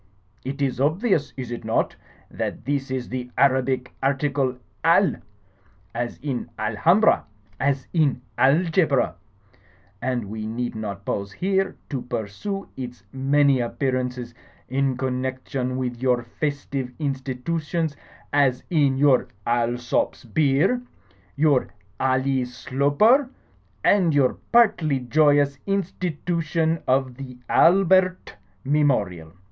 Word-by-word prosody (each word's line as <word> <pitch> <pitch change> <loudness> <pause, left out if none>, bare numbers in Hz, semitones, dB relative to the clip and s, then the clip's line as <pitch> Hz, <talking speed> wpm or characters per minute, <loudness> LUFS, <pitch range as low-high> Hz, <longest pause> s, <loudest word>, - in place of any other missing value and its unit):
It 140 +2 -3
is 130 -1 -1
obvious, 160 - +1
is 125 -2 -5
it 120 - -5
not, 110 +1 0 0.4
that - - -4
this 140 -1 -1
is 130 -1 -3
the 125 -1 -4
Arabic 130 -2 +2
article 135 -1 0 0.3
'Al,' - - +4 0.8
as 120 -1 -3
in 135 -5 -3
Alhambra, 140 - +3 0.4
as 135 -1 0
in 145 -7 +2
Algebra; 155 - +3 0.9
and 125 -4 -1
we 110 0 -4
need 120 +2 -3
not 100 -3 -6
pause 100 0 -3
here 190 - 0
to 135 -4 -3
pursue 125 - -4
its 125 -6 -7
many 140 0 +3
appearances 125 -1 -2 0.4
in 135 0 0
connection 130 0 -2
with 125 -2 -3
your 125 -2 +2
festive 140 0 -3
institutions, 145 +3 -2 0.4
as 135 -3 +2
in 140 -5 +3
your 135 -2 +4 0.2
Alsop's 120 +1 0
beer, 150 - +2 0.5
your 145 -3 +3 0.3
Ally 130 0 +1
Sloper, 145 - +2 0.5
and 180 -7 +4
your 135 -3 +4 0.2
partly 190 - +4
joyous 145 +2 +3
institution 165 -4 -1
of 130 -1 +1
the 130 -2 -8
Albert 185 +1 +4 0.3
Mem 150 +2 +3
orial. 90 - -1
135 Hz, 110 wpm, -24 LUFS, 125-155 Hz, 0.9 s, Al